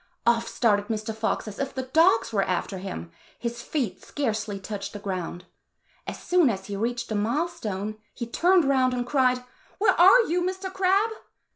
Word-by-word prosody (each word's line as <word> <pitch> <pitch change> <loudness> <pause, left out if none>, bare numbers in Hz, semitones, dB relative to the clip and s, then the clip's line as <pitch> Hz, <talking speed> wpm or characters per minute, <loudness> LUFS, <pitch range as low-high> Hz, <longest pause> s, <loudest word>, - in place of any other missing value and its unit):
Off 235 0 +3
started 205 -4 +1
Mr. 220 -1 -3
Fox 220 0 -1
as 205 - -8
if 275 -1 -3
the 260 - -2
dogs 260 -4 +3
were 200 - +3
after 185 0 -2
him. 85 - -6 0.3
His 235 0 -4
feet 235 -12 -3
scarcely 215 -7 -2
touched 200 0 -6
the - - -5
ground. 180 -3 -4 0.6
As - - -4
soon 355 -6 +3
as 195 -3 -3
he 200 - -5
reached 235 +4 -2
the - - -4
mile 235 +11 +1
stone, 215 - -5 0.2
he 235 - -4
turned 345 +8 +3
round 260 -2 +3
and 245 0 -2
cried, 255 -1 +2 0.3
"Where 390 -2 +4
are 380 +8 +7
you, 355 -4 0
Mr. 375 +1 -3
Crab?" 385 +3 +2
235 Hz, 180 wpm, -26 LUFS, 205-320 Hz, 0.6 s, are